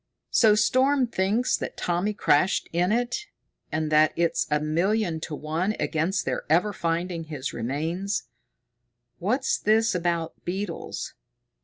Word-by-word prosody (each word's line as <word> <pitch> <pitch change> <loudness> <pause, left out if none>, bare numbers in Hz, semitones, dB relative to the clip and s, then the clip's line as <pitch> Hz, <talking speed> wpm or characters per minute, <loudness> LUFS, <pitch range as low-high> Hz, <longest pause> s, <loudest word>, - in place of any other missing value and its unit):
"So 215 -3 +5
Storm 260 +5 +3
thinks 220 +2 +1
that - - -6
Tommy 180 +4 -1
crashed 165 -1 +2
in 175 +3 +2
it, 245 - -1 0.4
and 155 -1 -1
that 155 0 +5
it's 170 0 +1
a 150 0 +2
million 170 +3 0
to 155 -1 -5
one 165 +8 -1
against 170 +4 0
their - - -1
ever 180 +7 +3
finding 170 0 -2
his 145 -5 -5
remains. 160 - -2 1.0
What's 250 +9 0
this 220 +1 +3
about 170 -2 -2
beetles? 190 0 -4
175 Hz, 130 wpm, -26 LUFS, 160-210 Hz, 1.0 s, So